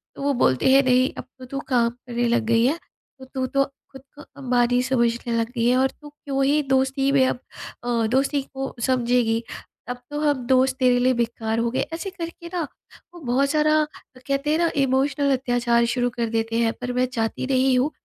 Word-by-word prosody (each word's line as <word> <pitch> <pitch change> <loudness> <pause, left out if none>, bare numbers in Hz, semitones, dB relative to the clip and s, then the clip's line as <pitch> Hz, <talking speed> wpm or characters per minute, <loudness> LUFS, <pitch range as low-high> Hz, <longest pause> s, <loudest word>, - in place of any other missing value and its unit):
तो - - -9
वो 285 0 +2
बोलते 185 - +2
हैं 275 - +7
नहीं 255 0 +3
अब - - -5 0.2
तो 255 - -9
तू 275 +2 -5
काम 235 -2 +3
करने 240 0 -3
लग 235 - +2
गई 230 +1 +3
है, 300 +6 +2 0.4
तो 260 - -10
तू 260 0 -3
तो 275 +1 +2 0.3
खुद 265 -1 -12
को 295 - -12 0.2
अंबानी 245 -1 +2
समझने 235 -2 0
लग 230 0 0
गई 230 +1 +2
है 250 - +3
और 265 0 +3
तू 295 -1 -14
क्यों 275 -2 -3
ही 295 +2 +3
दोस्ती 270 +1 +2
में 265 -2 +4
अब 245 - -2 0.4
अ, 235 -2 0
दोस्ती 275 +3 +1
को 270 0 -4
समझेगी। 240 -2 +1 0.5
अब 245 - -3
तो 295 0 -4
हम 285 -5 0
दोस्त 260 0 +3
तेरे 250 -1 +4
लिए 255 +1 +3
बेकार 230 -1 -1
हो 230 0 0
गए। - - 0
ऐसे 340 +4 -4
करके 340 -2 -8
ना, 355 - -1 0.5
वो 345 - -11
बहुत 270 +2 +1
सारा 305 +1 +3 0.4
कहते 275 +2 0
हैं 315 - +3
ना 335 -1 +3
इमोशनल 275 +2 +1
अत्याचार 245 -2 +1
शुरू 245 +1 0
कर 235 -2 -3
देते 225 0 -1
हैं, 225 -1 +2
पर 250 0 -3
मैं 250 +1 +2
चाहती 230 0 -2
नहीं 260 -1 +3
हूँ 290 +4 +1
255 Hz, 210 wpm, -23 LUFS, 240-275 Hz, 0.5 s, हैं